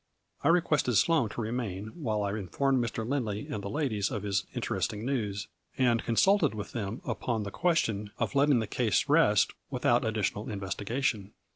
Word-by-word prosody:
I - - +2
requested 155 -7 +3
Sloane 150 - +3
to 115 - -5
remain 110 -3 -3
while 110 -10 -2
I 100 - -1
informed 120 +7 0
Mr. 115 -1 -3
Lindley 115 -6 -2
and 100 - -4
the 100 - -4
ladies 110 -6 0
of 105 -6 -4
his 100 -1 0
interesting 105 +2 -2
news, 105 -7 -2 0.3
and 120 -4 +3
consulted 150 - +3
with 105 - -6
them 110 0 -4
upon 115 -3 -2
the 100 - -5
ques 170 - +2
tion 105 -1 -3
of - - -1
letting 140 -1 +4
the 110 - 0
case 115 +1 +1
rest 145 -9 +4 0.2
without 125 -2 +2
additional 110 -2 -1
investigation. 105 +1 -2
115 Hz, 170 wpm, -29 LUFS, 105-135 Hz, 0.3 s, letting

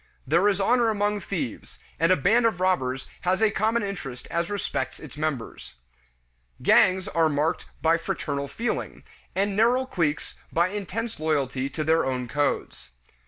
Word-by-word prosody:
There 170 +9 +3
is 200 - 0
honor 235 +3 +3
among 205 -1 0
thieves, 170 - -5 0.2
and 165 +2 +4
a - - +7
band 225 - +4
of 205 -6 -2
robbers 135 -9 0
has 185 +1 +1
a 220 -1 +4
common 220 +3 +1
interest 135 -11 -5
as 170 0 -1
respects 155 -10 -3
its 150 -5 -11
members. 145 - -4 0.9
Gangs 185 0 +4
are 165 -1 +2
marked 150 +2 0 0.2
by 165 +1 +4
fraternal 140 -3 -3
feeling, 230 +12 -3 0.3
and 200 +1 +1
narrow 240 +5 +3
cliques 165 -11 -1 0.2
by 170 +2 +2
intense 210 +3 -4
loyalty 140 -4 0
to 155 +2 -3
their 160 +2 +3
own 125 -2 -2
codes. 145 - -2
170 Hz, 155 wpm, -26 LUFS, 145-205 Hz, 0.9 s, a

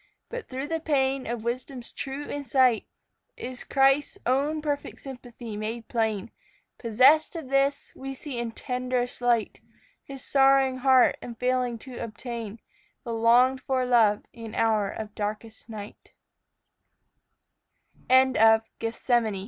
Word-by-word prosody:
But - - -7
through 265 +1 -4
the 325 +1 -2
pain 270 -4 0
of 235 -1 -4
wisdom's 245 +1 -4
true 275 +1 -5
insight 260 -4 +2 0.5
Is 250 0 -6
Christ's 275 +6 +2
own 285 +5 +1
perfect 290 -1 -3
sympathy 245 -4 -9
made 220 +2 -5
plain. 220 -3 -1 0.5
Possessed 260 +9 +4
of 320 -6 -6
this, 275 +1 +1
we 270 0 -6
see 265 -2 -6
in 235 -1 -3
tenderest 250 0 -3
light 240 -2 +1 0.4
His 270 -2 -10
sorrowing 270 -1 +4
heart 260 -1 +5
in 235 - -7
failing 250 0 0
to 255 -3 -9
obtain 230 -1 -6 0.4
The 235 -4 -4
longed 245 +3 +4
for 260 -1 0
love 225 -4 +3
in 230 -2 -9
hour 215 -3 +2
of 215 0 -7
darkest 215 +2 -5
night. 210 -2 -10 2.0
ON 260 0 +5
LAKE 220 0 +6 0.2
MEMPHREMAGOG. 230 -1 0
250 Hz, 130 wpm, -26 LUFS, 230-270 Hz, 2.0 s, LAKE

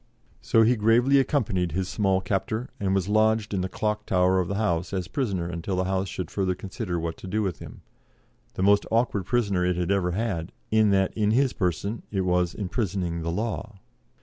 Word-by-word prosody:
So 115 - +4
he 120 +3 +4
gravely 120 +5 +4
accompanied 105 - 0
his 95 +1 -1
small 95 -2 +1
captor, 105 +6 -2
and 95 -1 0
was 95 -1 0
lodged 110 0 +2
in 95 - 0
the 95 - -2
Clock 105 +1 -2
Tower 90 0 +3
of 90 - 0
the 100 - -2
House 90 -4 -1
as 90 -3 -2
prisoner 100 - -2
until 85 +2 -3
the 90 - +1
House 95 +1 -1
should 90 -4 -5
further 95 -2 0
consider 90 -1 -4
what 80 0 -4
to - - -9
do 110 +3 0
with 90 -7 -3
him - - -11 0.7
the 95 - -1
most 100 +1 +4
awkward 110 -5 0
prisoner 100 -7 +1
it 90 0 +1
had 90 +1 -1
ever 90 -3 +1
had, 95 -5 -2 0.2
in 110 -1 +4
that 95 -1 +2
in 105 -2 +1
his 130 +4 +2
person 100 +4 -2
it 95 -2 -1
was 90 -1 +1
imprisoning 95 -4 -2
the 85 - -3
law. 110 +2 -3
95 Hz, 205 wpm, -26 LUFS, 90-110 Hz, 0.7 s, So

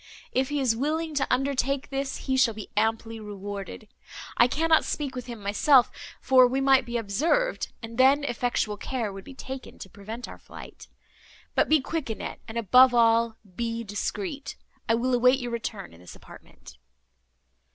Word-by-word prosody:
If 260 +1 0
he 290 0 -1
is 250 -4 +2
willing 310 +5 -2
to 280 -2 -1
undertake 270 +1 0
this 275 0 -4
he 265 - 0
shall 240 -4 +3
be 215 - -9
amply 225 +1 -1
rewarded. 205 0 -7 0.5
I 240 - +5
cannot 320 +5 +3
speak 285 -3 -3
with 250 0 -6
him 235 -2 -7
myself, 225 +6 +4 0.3
for 255 -1 +5
we 260 +2 -1
might 270 -2 +4
be 235 0 -2
observed, 305 - 0
and 230 +2 -8
then 275 +3 +5
effectual 240 -5 -1
care 225 -2 -3
would 195 0 -9
be 270 - -12
taken 265 0 -8
to 190 - -10
prevent 220 +5 -8
our - - -11
flight. - - -12 0.7
But - - +2
be 310 -2 +4
quick, 315 -1 -4
Annette, 220 - -5
and, 225 +1 -6
above 245 +3 +6
all, 230 -1 +3 0.2
be 230 +1 -3
discreet—I 210 +3 -4
will 250 +2 0
await 250 +2 +4
your 245 -2 -5
return 225 - -5
in 85 - -16
this 90 - -12
apartment." - - -15
245 Hz, 170 wpm, -26 LUFS, 225-270 Hz, 0.7 s, above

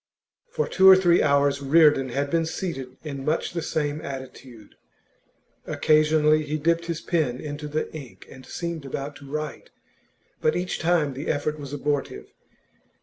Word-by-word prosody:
For 465 -1 -2
two 190 0 +6
or 190 - +11
three 175 -2 +4
hours 140 -1 +2
Reardon 145 -2 +4
had 140 +3 -2
been 165 -1 +1
seated 135 -8 -5
in 140 -3 -6
much 155 +4 -1
the 170 - -2
same 150 -1 -2
attitude. 130 -4 -9 0.9
Occasionally 155 0 +3
he 150 0 -3
dipped 170 +2 0
his 165 -2 -3
pen 145 -8 -1
into 150 0 -6
the 155 +1 -3
ink 145 -6 -10
and 130 - -13
seemed 170 +3 -5
about 140 +1 -5
to 140 -1 -13
write: 155 0 -5 0.7
but 155 - +2
each 180 +1 -2
time 160 -4 +1
the 140 +4 -6
effort 150 +1 -1
was 140 -2 -8
abortive. 145 0 -3
150 Hz, 155 wpm, -25 LUFS, 140-160 Hz, 0.9 s, or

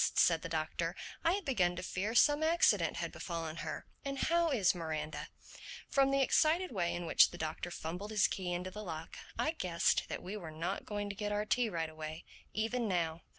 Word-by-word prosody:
said 165 -2 +4
the 180 - -5
Doctor. 165 +2 -2 0.3
"I 335 - +4
had 395 -2 -2
begun 185 -10 +2
to 180 - -5
fear 200 +5 -2
some 290 +4 +5
accident 330 +2 +3
had - - -3
befallen 165 -2 -4
her. - - -5 0.2
And 275 0 -3
how 335 +3 +2
is 220 - +3
Miranda?" 155 -3 -4 0.6
From 275 -1 +3
the 275 0 +3
excited 325 +6 +3
way 180 -6 0
in 175 0 -4
which - - +6
the 175 - -9
Doctor 160 +2 -3
fumbled 175 +4 -5
his 215 -1 +3
key 180 -2 -3
into 180 +1 -3
the 210 +2 -7
lock 165 -3 -6 0.2
I 310 - +1
guessed 180 - +1
that - - -4
we 190 +4 -5
were 175 -6 -6
not 165 +5 -3
going 205 -1 -2
to - - -9
get 210 +1 -3
our 210 0 0
tea 240 +1 +2
right 165 -4 -1
away, 155 0 -7 0.3
even 225 +2 -1
now. 170 -3 0
185 Hz, 205 wpm, -34 LUFS, 165-240 Hz, 0.6 s, which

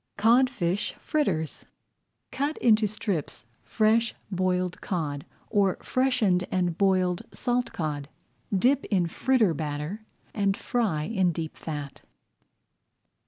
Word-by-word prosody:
CODFISH 225 -4 +2
FRITTERS 180 - -1 0.7
Cut 285 +3 -1
into 220 -2 +4
strips 195 - -3 0.2
fresh 225 +1 +2 0.2
boiled 180 -1 0
cod, 155 -9 -3 0.2
or 200 -3 +2
freshened 250 -9 +2
and 180 -2 +1
boiled 185 -2 +2
salt 245 -1 -1
cod. 150 -3 -3 0.4
Dip 250 +8 +3
in 185 -5 +1
fritter 220 +2 +2
batter 155 +7 -4 0.3
and 200 -2 +1
fry 210 -12 0
in 190 -1 +1
deep 160 -1 -5
fat. 145 -3 -6
190 Hz, 105 wpm, -27 LUFS, 165-230 Hz, 0.7 s, into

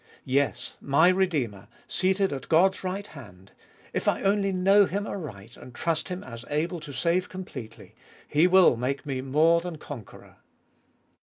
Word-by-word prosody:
Yes, 140 +2 -1
my 145 +5 +4
Redeemer, 150 - 0 0.2
seated 190 -1 +1
at 135 -2 -7
God's 190 +5 +3
right 190 +2 -3
hand 100 - -14 0.2
— - - -28
if - - -2
I - - +1
only 195 0 +2
know 195 +2 +5
Him 200 +1 -3
aright 115 - -7
and 125 - -13
trust 165 +1 -1
Him 180 0 -5
as 115 -2 -9
able 165 +4 -1
to 150 -2 -9
save 170 +5 0
completely 145 -11 -9 0.2
— - - -25
He 165 +4 +6
will 180 -9 +6
make 130 +3 -2
me 135 -3 -3
more 155 +5 +3
than 175 -2 -6
conqueror. 140 -7 -11
160 Hz, 165 wpm, -26 LUFS, 130-185 Hz, 0.2 s, He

